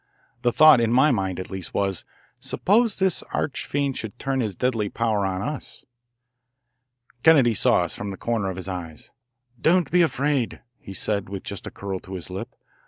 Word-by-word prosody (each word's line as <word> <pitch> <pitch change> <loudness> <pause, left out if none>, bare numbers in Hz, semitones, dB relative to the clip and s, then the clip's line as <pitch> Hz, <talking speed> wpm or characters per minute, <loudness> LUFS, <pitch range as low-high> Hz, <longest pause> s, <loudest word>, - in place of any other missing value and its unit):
The 120 - +2
thought, 155 -2 +7
in 115 -1 +1
my 130 +5 +5
mind 95 -6 -1
at 95 - -7
least, 95 -4 -7
was: 95 -2 -1 0.3
Suppose 220 +2 +2
this 190 -2 +1
arch 145 - -2
fiend 140 -2 -1
should 110 +1 -6
turn 135 +1 -1
his 105 -6 -2
deadly 115 -4 0
power 110 -3 0
on 95 0 -3
us? 150 -1 -5 1.4
Kennedy 140 -7 +6
saw - - +3
us - - -2
from 105 - -5
the 95 - -6
corner 115 -5 -1
of 95 - -4
his 95 0 -6
eye. 90 -4 -5 0.7
"Don't 170 -3 +3
be 180 - +5
afraid," 145 -6 0 0.2
he 95 - -9
said 100 0 -1
with 100 -1 -6
just 100 -3 -6
a - - -3
curl 95 -1 -5
to 95 +1 -9
his 90 0 -6
lip. 105 +7 -6
115 Hz, 185 wpm, -24 LUFS, 95-140 Hz, 1.4 s, thought